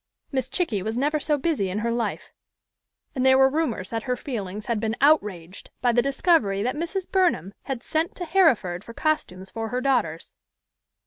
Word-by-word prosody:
Miss 260 -2 -1
Chickie 265 - 0
was 220 +4 -3
never 295 +4 +1
so 295 0 +1
busy 280 - 0
in 185 - -3
her 230 +2 -1
life, 235 0 -3 0.8
and 255 - -1
there 265 0 +6
were 265 0 +6
rumors 260 - -1
that 225 -1 -2
her 250 - +2
feelings 210 -6 -5
had 235 -2 -1
been 220 +1 -1
outraged 205 - +1
by 245 - +3
the 240 +1 +3
discovery 270 - +2
that 250 +4 -1
Mrs. 345 +4 -3
Burnham 355 - +1
had 260 -3 -4
sent 320 +4 -1
to 355 - -5
Harriford 250 - +2
for 230 - -11
costumes 190 - -2
for 225 0 -4
her 250 - -1
daughters. 240 - -1
250 Hz, 185 wpm, -25 LUFS, 210-305 Hz, 0.8 s, there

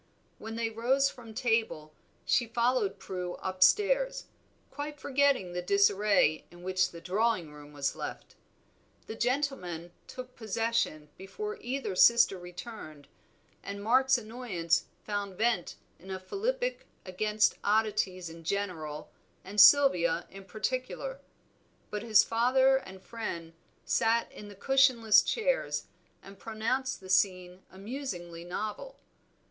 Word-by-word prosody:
When 225 0 -7
they 230 -1 -2
rose 265 +5 +2
from 230 -3 -13
table 225 -11 -1 0.3
she 240 - +2
followed 235 -2 0
Prue 180 -1 -5
up 185 0 -6
stairs, - - +3 0.5
quite 295 0 -6
forgetting 275 -10 +1
the 180 - -2
disarray 200 -3 +3
in 175 0 -15
which 185 0 +1
the 170 - -10
drawing 185 -3 0
room 145 0 -13
was 140 -1 -2
left. - - -7 0.7
The - - -6
gentlemen 225 - -2 0.2
took 255 0 -9
possession 220 -8 -1
before 420 - -6
either 245 -6 -3
sister 235 -2 +5
returned, 175 -5 -10 0.5
and 200 0 -7
Mark's 260 +4 +4
annoyance 215 -8 -1 0.2
found 200 -3 -4
vent 220 -5 0 0.2
in 190 - -14
a 190 -1 -4
philippic - - -3 0.2
against 210 +3 +1
oddities 205 -4 0
in 165 0 -11
general 160 -5 -4 0.3
and 200 +2 +3
Sylvia 180 - +6
in 195 0 -11
particular; 255 - -4 0.7
but 210 - -3
his 220 -2 +5
father 260 +3 +3
and 190 -7 -10
friend 170 -8 -6 0.3
sat 230 +1 +1
in 210 - -11
the 205 - -11
cushionless 255 -1 +4
chairs, - - -1 0.4
and 195 0 -13
pronounced 230 +4 -2
the 190 - -12
scene 185 -1 +1
amusingly 190 -6 -7
novel. 215 - -5
215 Hz, 125 wpm, -30 LUFS, 185-255 Hz, 0.7 s, Sylvia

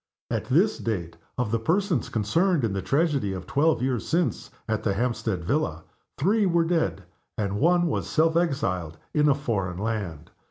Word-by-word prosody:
At - - -1
this - - +2
date, 90 -8 -3 0.2
of 125 -4 -1
the 115 - +1
persons 170 - 0
concerned 155 - +1
in 110 -4 0
the 95 - -2
tragedy 140 - +1
of 95 -1 -6
twelve 150 -1 +2
years 130 -3 -1
since 170 +1 0 0.2
at 110 -1 -1
the 100 -3 0
Hampstead 110 -5 -1
villa, 85 - -1 0.3
three 200 +7 +2
were 170 -2 +3
dead; 165 - 0 0.3
and 100 -1 -1
one 175 +3 +4
was 165 - -1
self 160 +1 +2
exiled 95 - 0 0.2
in 150 0 +4
a 140 - +4
foreign 100 -11 -2
land. 100 -7 -4
125 Hz, 170 wpm, -26 LUFS, 100-165 Hz, 0.3 s, one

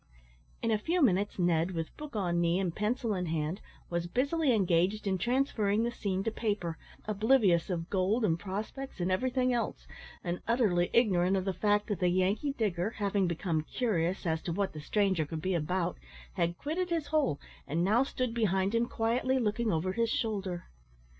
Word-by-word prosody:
In 230 - +1
a 215 - +2
few 340 +11 0
minutes 205 - +2
Ned, 175 0 +2
with 165 -1 -4
book 300 -4 -9
on 175 -4 +1
knee 170 +2 +2
and 180 -4 -1
pencil 220 +1 0
in 180 -2 -2
hand, 160 +4 -2 0.3
was 170 0 -2
busily 280 - +1
engaged 195 -1 +2
in 190 -2 0
transferring 225 -2 +1
the 240 - 0
scene 195 -4 -2
to 225 - -1
paper, 205 -7 -2 0.3
oblivious 210 -5 +3
of 170 -2 -2
gold, 200 +5 +2
and 165 -3 +1
prospects, 210 +8 -5
and 180 +1 0
everything 255 +5 +1
else, 235 -1 -2 0.4
and 175 -1 -3
utterly 210 -7 +2
ignorant 195 -5 +3
of 190 - -2
the 195 - 0
fact 205 +1 +2
that 205 -6 -3
the 180 - +3
Yankee 195 +10 +1
digger, 200 -6 0
having 200 -2 +1
become 170 -1 -1
curious 185 -1 -1
as 160 -1 0
to 175 - -4
what 195 +3 -1
the 155 - -7
stranger 190 0 +1
could 155 +2 -5
be 185 +4 -1
about, 175 +2 -1 0.3
had 170 -2 0
quitted 345 +5 -2
his 330 -3 0
hole, 285 - +2 0.3
and 160 +4 0
now 215 +6 +4
stood 255 -3 -1
behind 195 -3 +1
him 230 +1 +2
quietly 245 +4 +1
looking 225 -1 0
over 170 +3 0
his 230 +2 +1
shoulder. 195 -7 -2
200 Hz, 185 wpm, -31 LUFS, 175-230 Hz, 0.4 s, now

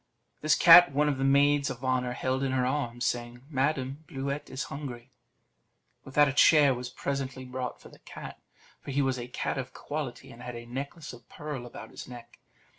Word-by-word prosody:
This 155 0 +4
cat 175 +1 +9
one 150 +2 +2
of 140 -3 0
the - - 0
maids 140 +1 +4
of 130 0 -6
honour 125 -1 0
held 130 +1 -1
in 135 -1 0
her 130 -1 +1
arms, 120 -3 -2
saying, 120 0 -3
"Madam, 135 +1 -1
Bluet 140 -2 -4
is 130 - -4
hungry!" 130 -3 -7 0.9
With 130 - -12
that 150 0 +6
a 135 - -1
chair 145 -1 +6
was 125 0 -5
presently 135 0 -4
brought 125 0 -5
for - - -14
the - - -17
cat; - - -10 0.4
for - - -10
he 140 +1 +1
was 130 -1 0
a 120 - -6
cat 125 - -3
of 130 0 -7
quality, 145 -5 -5
and 115 - -13
had 125 -1 -7
a 120 0 -8
necklace 140 +6 -6
of 120 -1 -15
pearl 145 -5 -6
about - - -10
his - - -9
neck. 120 -1 -12
130 Hz, 200 wpm, -28 LUFS, 125-140 Hz, 0.9 s, cat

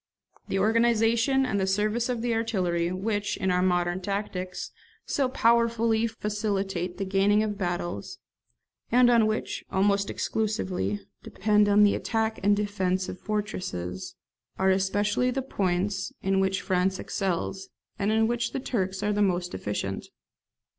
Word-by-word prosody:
The 195 - -1
organization 230 +4 +3
and 225 -6 0
the 190 - 0
service 215 +5 0
of 240 -2 -2
the 240 -1 +1
artillery, 180 -7 0
which, 205 +2 -2
in 190 - 0
our 180 0 +2
modern 175 0 +1
tactics, 185 -2 -4 0.3
so 270 -3 0
powerfully 230 -2 +2
facilitate 200 -5 -2
the 195 - -2
gaining 200 +2 +3
of 210 -1 -2
battles, 175 - -3 0.7
and 245 +1 +6
on 230 -2 +5
which, 215 0 -2
almost 200 +1 +2
exclusively, 205 -2 -2 0.2
depend 210 -1 +2 0.2
the 205 - +4
attack 220 -1 -1
and 205 +1 +3
defence 190 -3 -1
of 185 - -7
fortresses, 185 - -4 0.4
are 190 0 +3
especially 205 +5 +1
the 265 +1 -2
points 195 -4 -1
in 195 0 +2
which 190 0 0
France 190 +1 +1
excels, 190 0 -3 0.3
and 200 +2 +1
in 220 0 +3
which 240 +1 -1
the - - -1
Turks 195 -7 -2
are 210 - +1
most 180 -2 +1
deficient. 100 -1 -4
205 Hz, 140 wpm, -27 LUFS, 185-220 Hz, 0.7 s, and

